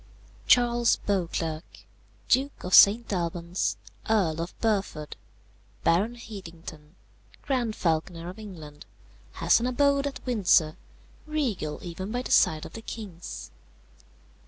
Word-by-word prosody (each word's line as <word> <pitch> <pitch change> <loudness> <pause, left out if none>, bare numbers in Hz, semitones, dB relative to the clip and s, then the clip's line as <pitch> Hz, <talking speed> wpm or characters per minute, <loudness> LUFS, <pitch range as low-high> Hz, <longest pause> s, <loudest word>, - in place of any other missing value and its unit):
"Charles 240 -1 +4
Beauclerc, 170 -4 -3 0.4
Duke 270 +3 +1
of 180 - -4
St. 215 +2 +7
Albans, 170 - -2 0.3
Earl 170 -8 +2
of 170 - -7
Burford, 195 -9 -1 0.7
Baron 205 +8 +2
Hedington, 165 -8 -10 0.5
Grand 245 -6 -1
Falconer 165 0 -1
of 185 +4 -8
England, 160 -8 -10 0.5
has - - +3
an 240 - -1
abode 280 +2 +2
at 270 -2 -7
Windsor, 185 -10 +3 0.5
regal 245 - -2
even 185 +3 -6
by 245 +2 -2
the - - -6
side 155 -1 +4
of - - -10
the 225 - -7
king's. 200 - -8
190 Hz, 115 wpm, -27 LUFS, 165-235 Hz, 0.7 s, St